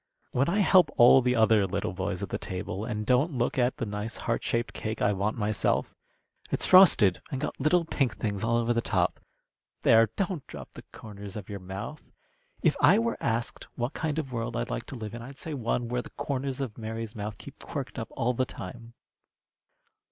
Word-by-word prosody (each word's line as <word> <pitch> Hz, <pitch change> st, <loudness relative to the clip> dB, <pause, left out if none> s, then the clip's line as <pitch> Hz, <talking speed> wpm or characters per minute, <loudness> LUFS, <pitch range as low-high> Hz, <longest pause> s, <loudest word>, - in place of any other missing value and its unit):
"When 135 Hz, +6 st, +1 dB
I 190 Hz, -, +1 dB
help 185 Hz, -2 st, +5 dB
all 125 Hz, +2 st, +8 dB
the 125 Hz, 0 st, +1 dB
other 110 Hz, -3 st, +4 dB
little 100 Hz, +1 st, -2 dB
boys -, -, -3 dB
at -, -, -4 dB
the -, -, -3 dB
table, 95 Hz, +2 st, -5 dB
and 105 Hz, -3 st, -3 dB
don't 130 Hz, +7 st, +2 dB
look 120 Hz, +2 st, 0 dB
at 125 Hz, +2 st, +1 dB
the 115 Hz, -, -2 dB
nice 105 Hz, +2 st, -4 dB
heart 115 Hz, -, -1 dB
shaped 115 Hz, 0 st, -1 dB
cake 110 Hz, 0 st, -4 dB
I 105 Hz, -, +2 dB
want 100 Hz, +3 st, -1 dB
myself? 105 Hz, -1 st, 0 dB, 0.6 s
It's -, -, +1 dB
frosted, 155 Hz, -, +7 dB
and 135 Hz, -, -2 dB
got 150 Hz, -, -4 dB
little 165 Hz, +4 st, +3 dB
pink 135 Hz, -5 st, -1 dB
things 100 Hz, -2 st, -2 dB
all 115 Hz, +1 st, +2 dB
over 120 Hz, 0 st, +1 dB
the 115 Hz, -, +1 dB
top. -, -, 0 dB, 0.6 s
There! 115 Hz, 0 st, +6 dB
don't 185 Hz, -7 st, -2 dB
drop -, -, -9 dB
the -, -, -10 dB
corners 100 Hz, -2 st, -10 dB
of 105 Hz, -2 st, -7 dB
your 100 Hz, -1 st, -5 dB
mouth. 95 Hz, +11 st, -8 dB, 0.5 s
If -, -, +4 dB
I 170 Hz, +10 st, +7 dB
were 230 Hz, +1 st, -1 dB
asked 115 Hz, +1 st, -2 dB
what 120 Hz, +3 st, -2 dB
kind 155 Hz, -2 st, -2 dB
of 145 Hz, -5 st, -3 dB
a -, -, -5 dB
world 115 Hz, -1 st, -3 dB
I'd -, -, -3 dB
like -, -, -4 dB
to -, -, -7 dB
live 110 Hz, -3 st, -6 dB
in, 120 Hz, -, -6 dB
I'd 135 Hz, +3 st, -10 dB
say 160 Hz, -, -5 dB
one 120 Hz, -2 st, -1 dB
where 125 Hz, +1 st, -1 dB
the -, -, -11 dB
corners 140 Hz, -2 st, -3 dB
of 120 Hz, -4 st, -5 dB
Mary's 115 Hz, +1 st, -5 dB
mouth 105 Hz, -1 st, -5 dB
keep -, -, -12 dB
quirked -, -, -5 dB
up -, -, -4 dB
all 125 Hz, +2 st, +1 dB
the 130 Hz, -, +1 dB
time. 115 Hz, +3 st, -9 dB
115 Hz, 210 wpm, -28 LUFS, 105-135 Hz, 0.6 s, all